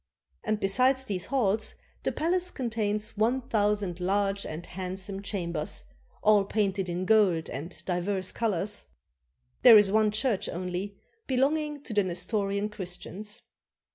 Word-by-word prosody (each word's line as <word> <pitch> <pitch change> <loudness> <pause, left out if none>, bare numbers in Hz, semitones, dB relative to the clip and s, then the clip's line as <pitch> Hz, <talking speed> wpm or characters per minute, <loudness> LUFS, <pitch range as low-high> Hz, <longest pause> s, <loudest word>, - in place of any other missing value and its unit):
And 215 -1 0
besides 255 +7 +3
these 190 -6 -3
halls 220 -5 +1 0.3
the - - 0
palace 360 +3 +2
contains 220 -7 -2
one 235 +5 +2
thousand 205 -6 0
large 195 +2 0
and 155 +3 -6
handsome 190 +1 -5
chambers, 170 -6 -3 0.4
all 210 -1 +5
painted 195 -2 -1
in 175 +2 -2
gold 190 -6 +3
and 145 +8 -7
divers 185 +1 -1
colors.... 205 -2 -1 0.7
There 235 -3 +10
is 205 -2 +5
one 215 0 +4
church 215 0 0
only, 185 +3 -4 0.3
belonging 290 +2 0
to 240 - -6
the 205 - +4
Nestorian 195 +3 -1
Christians. 205 +2 -5
205 Hz, 130 wpm, -28 LUFS, 185-220 Hz, 0.7 s, There